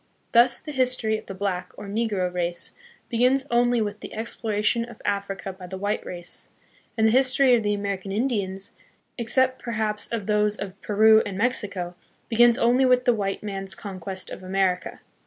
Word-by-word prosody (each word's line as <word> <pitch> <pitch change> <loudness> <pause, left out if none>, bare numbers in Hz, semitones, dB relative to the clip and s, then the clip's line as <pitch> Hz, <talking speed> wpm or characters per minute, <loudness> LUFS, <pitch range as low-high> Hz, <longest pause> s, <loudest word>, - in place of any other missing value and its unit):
Thus, 240 +1 +5
the 305 - -8
history 250 -5 +2
of - - -17
the 195 - -6
black, 185 -2 -3
or - - -8
negro, 200 -4 -1
race 175 -1 -2 0.3
begins 255 +3 +2
only 240 0 +3
with 210 0 -5
the - - -9
exploration 220 0 -1
of 235 -1 -11
Africa 200 -1 -2
by 185 -1 -11
the 190 +1 -6
white 205 +2 -2
race, 175 -1 -7 0.5
and 220 - +3
the 220 - +5
history 260 +1 +4
of 235 - +1
the 205 -1 0
American 200 -1 -4
Indians, 200 -4 -2 0.5
except 260 +3 +1
perhaps 215 -2 -1
of 225 -4 -4
those 210 0 +2
of 195 -1 -8
Peru 220 +1 +5
and 200 -2 -5
Mexico, 200 -6 -1 0.4
begins 240 +1 +5
only 245 +3 +3
with 250 -1 +4
the 245 - +5
white 200 -2 -2
man's 195 -2 -4
conquest 190 -1 -6
of - - -7
America. 185 -1 -1
210 Hz, 175 wpm, -25 LUFS, 195-235 Hz, 0.5 s, Thus